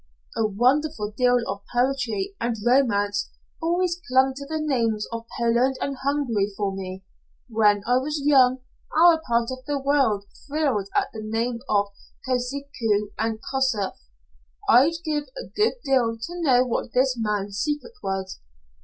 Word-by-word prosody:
"A 220 - +2
wonderful 250 +2 +1
deal 250 0 +4
of 200 - -4
poetry 245 -6 0
and 235 0 0
romance 205 -6 +2 0.3
always 345 +1 0
clung 260 +1 +3
to 280 +1 -8
the 315 +1 -2
names 230 -8 0
of 230 0 -6
Poland 235 +3 +2
and 275 - -2
Hungary 265 -7 0
for 200 -2 -1
me. 190 0 -6 0.4
When 210 -3 +3
I 245 +2 +3
was 295 +4 -2
young, 260 -3 +4 0.4
our 330 -1 +6
part 235 -1 +1
of 255 0 -7
the 290 -1 0
world 270 -8 +1 0.2
thrilled 275 -10 0
at - - +1
the 220 - -6
name 230 +2 -2
of 205 -1 +2 0.4
Kosciuszko 250 -5 -1
and 225 -1 -1
Kossuth. 260 -8 0 0.7
I'd 270 +7 +6
give 300 -2 -1
a - - -5
good 425 +1 +3
deal 245 -4 +2
to 345 +10 -6
know 255 -5 +4
what 235 -1 -3
this 255 0 +3
man's 205 -3 -2
secret 295 - -2
was. 190 -1 -4
250 Hz, 150 wpm, -24 LUFS, 215-280 Hz, 0.7 s, our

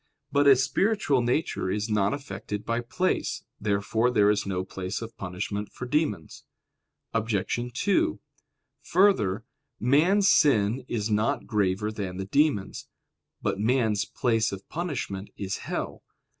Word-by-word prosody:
But 145 0 +3
a 140 - +9
spiritual 140 - +1
nature 120 - 0
is 105 +3 -1
not 105 -2 +2
affected 105 -6 -5
by 115 0 0
place. 185 +10 -1 0.2
Therefore 105 +3 +1
there 105 -4 +4
is 100 -1 -1
no 95 -1 -2
place 95 0 -4
of 115 0 -8
punishment 100 +2 -4
for 125 - -7
demons. 125 - -1 0.7
Obj. 115 +2 -1
2: 205 - +1 0.6
Further, 120 - +2 0.3
man's 170 - +4
sin 125 - +3
is 110 -3 -2
not 105 +1 +1
graver 105 0 0
than 95 -4 -5
the 95 - -3
demons'. 140 -3 0 0.6
But - - -1
man's 110 -3 +2
place 115 +1 0
of 100 0 -8
punishment 135 - -4
is 100 -1 -3
hell. - - -4
110 Hz, 130 wpm, -27 LUFS, 100-135 Hz, 0.7 s, a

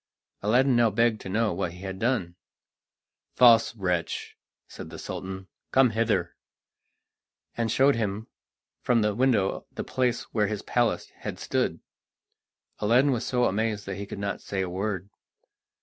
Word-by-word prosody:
Aladdin 125 +5 +3
now 120 -1 +4
begged 115 +1 +1
to - - -7
know 105 0 +1
what 90 -1 -2
he 90 - -12
had 95 -1 -6
done. 115 -8 0 1.0
"False 115 -1 +6
wretch!" 90 -5 -2 0.3
said - - -9
the - - -9
Sultan, 95 0 -6 0.2
"come 130 -3 +4
hither," 105 -6 0 1.2
and 115 -2 -1
showed 135 +4 +4
him 105 -1 -2 0.6
from 120 -3 +2
the 105 0 +1
window 115 -4 +1
the - - -5
place 125 -2 0
where 105 -2 +2
his 105 -1 -4
palace 120 -2 0
had - - -6
stood. - - -1 1.0
Aladdin 125 +7 +4
was 120 -2 -1
so 125 -1 +2
amazed 105 0 -1
that 95 0 -5
he 100 0 -6
could - - -7
not 100 0 -3
say 95 -1 -3
a 95 - -1
word. 100 0 -3
110 Hz, 150 wpm, -27 LUFS, 95-120 Hz, 1.2 s, False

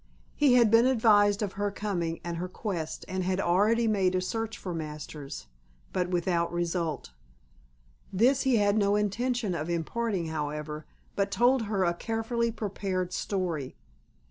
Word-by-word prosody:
He 285 -4 +4
had 235 -4 +5
been 230 +2 +6
advised 210 -4 +4
of 200 - -3
her 205 +1 -1
coming 185 -5 -3
and 170 -1 -4
her 180 +2 -3
quest 180 -4 -4
and 185 0 -2
had 185 +1 0
already 210 +6 +3
made 190 -4 +2
a - - +3
search 225 +3 -3
for 180 - -5
Masters, 150 - -6 0.5
but 180 -1 0
without 175 -1 0
result. 170 - -2 1.0
This 250 +8 +3
he 265 -2 +3
had 205 0 +3
no 200 0 +3
intention 215 +1 0
of 170 -1 -3
imparting, 175 +1 -1
however, 150 0 -4 0.3
but 200 0 +1
told 245 +2 +3
her 200 -2 0
a 175 -1 +2
carefully 225 +4 -1
prepared 195 -4 -3
story. 175 -11 -2
195 Hz, 150 wpm, -28 LUFS, 170-225 Hz, 1.0 s, been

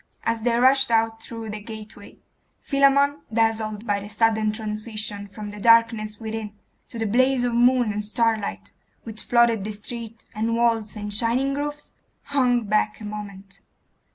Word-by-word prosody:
As 230 -1 -1
they 235 +1 +1
rushed 265 +2 +4
out 225 -1 +1
through 225 -2 -7
the 210 0 -6
gateway, 215 -1 -11 0.4
Philammon, 280 +1 +3
dazzled 220 -1 0
by 205 -2 0
the 200 - -8
sudden 220 0 +2
transition 215 -1 -5
from 210 +1 -8
the 210 - -9
darkness 225 -1 +3
within 220 -2 -5 0.3
to 235 - -7
the 225 - -1
blaze 255 +4 +2
of 245 -1 0
moon 240 -2 +3
and 210 0 -3
starlight 210 - -1 0.3
which 220 -2 -5
flooded 235 -3 +3
the 215 - -4
street, 225 +2 -7
and 225 +1 -1
walls, 230 -2 +1
and 205 -1 -5
shining 240 +6 +1
roofs, 295 +1 -4 0.3
hung 250 -4 +2
back 210 0 0
a 215 - -8
moment. 200 -2 -8
225 Hz, 155 wpm, -24 LUFS, 210-235 Hz, 0.4 s, rushed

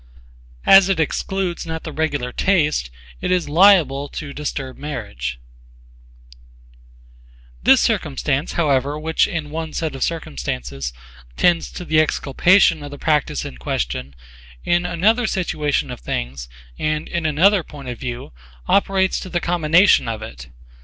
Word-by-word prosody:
As 195 0 +7
it 190 -4 +1
excludes 175 +2 -2
not 160 0 -5
the 160 - -6
regular 145 -5 -2
taste, 150 - +1 0.3
it - - -2
is 180 -3 +1
liable 150 -5 +4
to 145 -3 -7
disturb 140 -3 -5
marriage 60 - -5 2.2
This - - +5
circumstance, 70 - -1
however, 145 -3 +1
which 160 +1 +1
in 155 -3 -4
one 160 0 -5
set 160 -3 -2
of 135 - -8
circumstances 65 - -3 0.5
tends 175 -2 +2
to 180 - -7
the 155 -1 +3
exculpation 160 +3 +3
of 145 - -7
the 145 - -9
practise 150 -1 0
in 65 - -8
question, 65 +1 -3 0.5
in 175 0 +1
another 215 +8 +2
situation 155 -7 -1
of - - -7
things, - - -5 0.3
and, 155 0 -1
in 170 -2 -2
another 185 +6 +4
point 145 -4 -11
of 120 - -6
view, 120 - -6 0.3
operates 190 -1 +2
to 185 - -8
the 175 - -1
commination 170 -1 +3
of 110 -1 -4
it. 60 -1 -10
155 Hz, 140 wpm, -20 LUFS, 130-175 Hz, 2.2 s, As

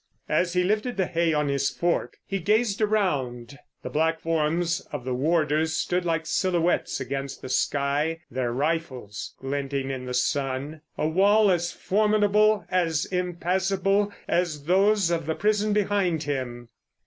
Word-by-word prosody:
As 175 -1 +1
he 180 0 +2
lifted 215 +5 0
the 190 - +2
hay 170 -1 +1
on 150 -1 +1
his 140 0 +1
fork 175 0 -1
he 195 - -2
gazed 210 +3 +1
around. 140 - -1 0.2
The - - -5
black 160 +1 +1
forms 165 +2 0
of 145 -4 -5
the 130 - -1
warders 155 +3 +1
stood 180 0 -1
like 165 -1 0
silhouettes 175 0 0
against 135 +1 -5
the 130 - -6
sky, 145 +5 0
their 125 -1 -1
rifles 130 -6 -3
glinting 135 0 -3
in 130 -1 -5
the 125 - -3
sun, 140 +3 -1 0.2
a 155 - 0
wall 200 +5 +4
as 175 -1 0
formidable, 210 +1 +2
as 165 -4 +1
impassable, 190 +3 0 0.2
as 165 -5 0
those 195 +2 +3
of 165 -3 -1
the 160 - 0
prison 210 0 +1
behind 200 -6 +1
him. 125 -4 -4
165 Hz, 150 wpm, -25 LUFS, 140-190 Hz, 0.2 s, wall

